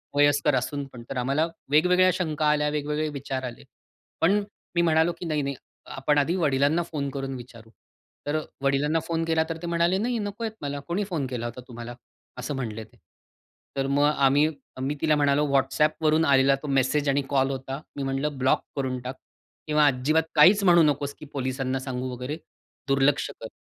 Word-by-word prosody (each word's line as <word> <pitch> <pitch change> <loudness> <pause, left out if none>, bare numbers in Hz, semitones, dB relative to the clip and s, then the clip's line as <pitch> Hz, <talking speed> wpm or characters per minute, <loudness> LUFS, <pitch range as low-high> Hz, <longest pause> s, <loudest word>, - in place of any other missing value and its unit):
वयस्कर 145 0 +4
असूनपण. 130 -1 -4
तर - - -4
आम्हाला 135 +6 +1 0.3
वेगवेगळ्या 180 +4 +5
शंका 155 -4 -1
आल्या, 150 0 +2
वेगवेगळे 150 +1 -1
विचार 135 -2 -4
आले. 120 -2 -7 0.6
पण 200 +5 +3 0.3
मी 170 - +4
म्हणालो 160 0 +3
की - - -5
"नाही, 155 -2 0
नाही 140 0 -3 0.4
आपण 140 +2 +1
आधी 155 +5 +2
वडिलांना 150 0 +2
फोन 145 -4 -4
करून 135 0 -4
विचारू." 115 -2 -11 0.6
तर 150 +2 +1 0.2
वडिलांना 145 +4 +2
फोन 165 -1 -1
केलातर 160 0 0
ते 175 - -5
म्हणाले, 170 +2 +2
"नाही, 235 +2 -1
नकोय 210 +2 -3
मला 145 0 -3
कोणी 180 +5 -1
फोन 155 -6 -1
केला 120 -2 -4
होता 120 +2 -6
तुम्हाला." 120 0 -8 0.4
असं 125 +3 -4
म्हणले 115 -4 -4
ते. 110 - -21 0.8
तर 135 0 0
मग 140 +1 +2
आम्ही 145 0 +4 0.3
मी 140 +3 -1
तिला 155 -1 +3
म्हणालो 145 0 +2
WhatsAppवरून 155 +3 +2
आलेला 135 -1 +5
तो - - -5
मेसेज 140 +1 +1
आणि 140 +1 +2
कॉल 135 -1 +2
होता. 135 +2 -5
मी 140 - -3
म्हटलं 135 +1 -2
ब्लॉक 130 +1 +2
करून 130 -2 -2
टाक 130 +2 -6 0.5
किंवा 150 -1 +4
अजिबात 145 +5 +2
काहीच 190 +7 +7
म्हणू 175 -3 +6
नकोस 145 -1 +1
की - - -9
पोलिसांना 130 0 -2
सांगू 130 -1 -4
वगैरे 125 +5 -5 0.5
दुर्लक्ष 135 +1 +2
कर. 110 - -5
145 Hz, 175 wpm, -26 LUFS, 135-155 Hz, 0.8 s, काहीच